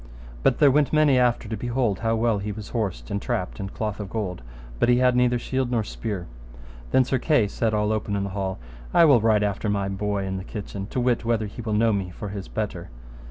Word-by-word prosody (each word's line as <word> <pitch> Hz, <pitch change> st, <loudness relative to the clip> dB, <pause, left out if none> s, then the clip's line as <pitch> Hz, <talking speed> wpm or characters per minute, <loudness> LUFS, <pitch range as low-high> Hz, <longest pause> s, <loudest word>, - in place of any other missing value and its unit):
But -, -, +3 dB
there 145 Hz, -2 st, +6 dB
went 145 Hz, +1 st, +2 dB
many 150 Hz, -4 st, +4 dB
after 120 Hz, -2 st, +2 dB
to 110 Hz, -, -3 dB
behold 120 Hz, -2 st, -1 dB
how 115 Hz, 0 st, +1 dB
well 115 Hz, -2 st, +1 dB
he 105 Hz, +1 st, -3 dB
was 105 Hz, 0 st, -8 dB
horsed 110 Hz, -3 st, -3 dB
and 100 Hz, 0 st, -1 dB
trapped -, -, -3 dB
in 95 Hz, -, -4 dB
cloth 105 Hz, 0 st, -4 dB
of 100 Hz, -2 st, -5 dB
gold, 95 Hz, -, -3 dB, 0.4 s
but -, -, +3 dB
he 120 Hz, -, +5 dB
had 125 Hz, 0 st, +3 dB
neither 125 Hz, 0 st, +3 dB
shield 130 Hz, +1 st, -2 dB
nor 120 Hz, -3 st, +1 dB
spear. 105 Hz, -4 st, -5 dB, 0.6 s
Then 130 Hz, -, +4 dB
Sir 130 Hz, 0 st, 0 dB
Kay 135 Hz, -7 st, +3 dB
said 110 Hz, +2 st, -1 dB
all 105 Hz, 0 st, +1 dB
open 105 Hz, -1 st, -1 dB
in 100 Hz, -, -1 dB
the 100 Hz, -, -3 dB
hall, 95 Hz, -1 st, -3 dB, 0.4 s
I 170 Hz, -, +8 dB
will 135 Hz, -7 st, +6 dB
ride 110 Hz, -1 st, +3 dB
after 105 Hz, +1 st, -1 dB
my 100 Hz, -1 st, 0 dB
boy 100 Hz, 0 st, -2 dB
in 95 Hz, 0 st, -3 dB
the 95 Hz, -, -5 dB
kitchen, 100 Hz, -1 st, -6 dB
to 125 Hz, -, -3 dB
wit 120 Hz, -1 st, +1 dB
whether 115 Hz, -1 st, 0 dB
he 105 Hz, +3 st, -7 dB
will 110 Hz, -2 st, -3 dB
know 110 Hz, +1 st, +3 dB
me 95 Hz, -2 st, -2 dB
for 100 Hz, +3 st, -7 dB
his 100 Hz, -1 st, -6 dB
better. 100 Hz, -5 st, -4 dB
110 Hz, 240 wpm, -24 LUFS, 100-120 Hz, 0.6 s, I